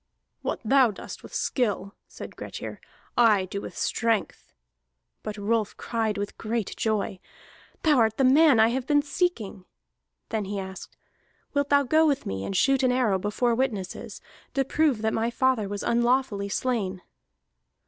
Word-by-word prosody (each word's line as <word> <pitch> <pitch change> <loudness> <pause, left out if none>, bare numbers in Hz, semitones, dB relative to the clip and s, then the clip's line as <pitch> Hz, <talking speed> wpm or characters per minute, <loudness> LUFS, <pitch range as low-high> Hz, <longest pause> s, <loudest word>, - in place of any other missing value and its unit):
"What - - -3
thou 265 +1 +5
dost 205 - -8
with - - -12
skill," 205 -6 -1
said - - -10
Grettir, - - -7 0.3
"I 215 -5 +4
do 200 +2 -5
with - - -8
strength." 230 -3 -1 0.7
But 215 -1 -6
Rolf 215 +1 -1
cried 225 -3 -1
with 205 0 -5
great 225 -2 -2
joy: 210 -3 -1 0.6
"Thou 300 -5 +4
art 220 -1 +2
the 270 - +2
man 275 -1 +6
I 220 +1 +6
have 255 +1 -2
been 290 -1 +3
seeking!" 290 - -2 0.7
Then 220 -2 -2
he 200 +1 -4
asked: 190 -1 -7 0.6
"Wilt 285 0 0
thou 285 0 +5
go 315 +4 +4
with 285 -3 0
me 95 0 -3
and 195 - -4
shoot 270 +6 +3
an 255 -1 +3
arrow 235 -7 +2
before 210 +5 0
witnesses, 230 -7 -3 0.3
to 270 -1 +2
prove 275 -6 +1
that 220 - +1
my 225 +1 0
father 240 -4 +1
was 205 0 -4
unlawfully 235 -4 +1
slain?" 200 -5 -2
230 Hz, 160 wpm, -26 LUFS, 205-260 Hz, 0.7 s, man